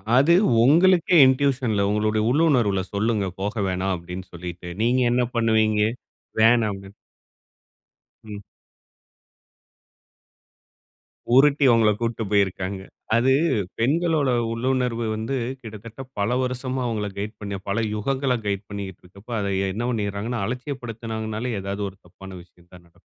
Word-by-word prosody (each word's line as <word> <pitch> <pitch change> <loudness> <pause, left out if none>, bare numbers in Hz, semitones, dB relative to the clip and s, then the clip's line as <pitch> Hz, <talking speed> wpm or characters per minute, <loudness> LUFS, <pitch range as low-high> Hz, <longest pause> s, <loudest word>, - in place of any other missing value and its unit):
அது 140 +6 +5 0.3
உங்களுக்கே 175 +5 +5
இன்டியூஷன் 130 -3 +2
உங்களுடைய 105 +1 +1
உள்ளுணர்வில 125 -9 +2
சொல்லுங்க 105 -1 0
போக 100 +2 -2
வேணாம். 95 +1 -1
அப்டினு 90 +2 -8
சொல்லிட்டு 85 0 -7
நீங்க 125 +3 +2
என்ன 125 +1 +2
பண்ணுவீங்க. 110 -2 +2 0.6
வேணாம் 115 -1 +5
அப்டின் 95 +1 -12 1.3
ம். 105 -2 -8 3.0
உருட்டி 140 +1 +5
உங்கள 110 -2 +4
கூட்டி 115 -1 -2
போயிருக்காங்க. 95 -1 0 0.3
அது 125 +3 +3 0.5
பெண்களோட 155 +3 +1 0.2
உள்ளுணர்வு 125 -1 -1
வந்து 110 +5 -3 0.3
கிட்டத்தட்ட 110 +2 -10 0.2
பல 110 +5 +1
வருஷமா 130 +1 -3
அவங்கள 105 -3 -2
கைடு 105 +2 -4
பண்ணி 100 -1 -4
பல 110 +4 0
யுகங்கள 130 +4 0
கைடு 100 -1 -1
பண்ணிட்டு 100 -3 -7
இருக்க 95 +2 -16
அப்ப 120 - -7
அதை 100 -1 -1 0.2
என்ன 110 +4 -3
பண்ணிறாங்கனா 105 +1 -2
அலட்சியப்படுத்தினாங்கனாலே 115 -3 -4
ஏதாவது 100 +1 -4
ஒரு 95 - -18
தப்பான 95 +2 -12
விஷயம் 85 0 -26
தான் 90 -1 -15
நடக்கும். 85 - -31
110 Hz, 120 wpm, -23 LUFS, 100-125 Hz, 3.0 s, அது